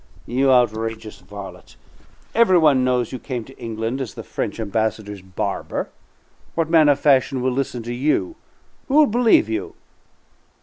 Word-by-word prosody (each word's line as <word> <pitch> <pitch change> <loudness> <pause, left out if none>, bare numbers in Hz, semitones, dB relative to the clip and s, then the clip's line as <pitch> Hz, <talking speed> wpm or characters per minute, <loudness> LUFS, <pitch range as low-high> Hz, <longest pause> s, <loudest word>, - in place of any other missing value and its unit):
"You 135 +2 +2
outrageous 115 -3 0
varlet! 100 -2 -11 0.6
Every 225 -5 +5
one 145 -6 +4
knows 125 -2 0
you 130 - -5
came 125 -3 -5
to 135 - -15
England 115 +3 -3
as 125 - -6
the - - -7
French - - -4
Ambassador's 110 -2 -2
barber. 95 0 -4 0.7
What 165 -1 -1
man 155 -3 +6
of 145 -1 +3
fashion 135 -2 +3
will 130 +1 0
listen 125 -2 -3
to 120 +1 -5
you? 150 - 0 0.5
Who 275 - -1
will 305 0 +7
believe 235 - +3
you?" 110 -3 -4
125 Hz, 150 wpm, -21 LUFS, 110-145 Hz, 0.7 s, will